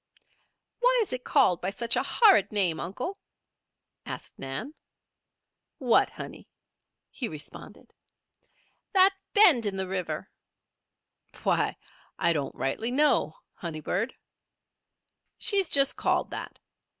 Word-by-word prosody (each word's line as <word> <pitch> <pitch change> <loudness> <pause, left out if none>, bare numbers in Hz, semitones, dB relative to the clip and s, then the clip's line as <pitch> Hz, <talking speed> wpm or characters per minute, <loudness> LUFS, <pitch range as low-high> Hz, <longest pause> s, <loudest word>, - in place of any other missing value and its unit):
"Why - - +3
is 395 - -6
it 255 0 -4
called 250 - +2
by 185 - -2
such 230 +4 0
a - - +2
horrid 425 - +4
name, 185 -7 +2
Uncle?" 255 - -5 0.8
asked - - -8
Nan. 135 - -5 1.0
"What, 245 -4 +3
honey?" - - -10 0.6
he 250 - -4
responded. 155 -5 -11 1.0
"That 385 0 +6 0.2
bend 345 - +6
in 195 -1 -3
the 190 0 -2
river." 180 -5 -4 1.1
"Why, - - 0 0.4
I 170 - +2
don't 145 -3 -3
know - - -19
rightly, 220 - -2 0.6
honey 165 -3 -7
bird. 200 - -2 1.2
She's 395 -4 +1
just 275 -1 +4
called - - 0
that. - - -7
225 Hz, 115 wpm, -27 LUFS, -, 1.2 s, That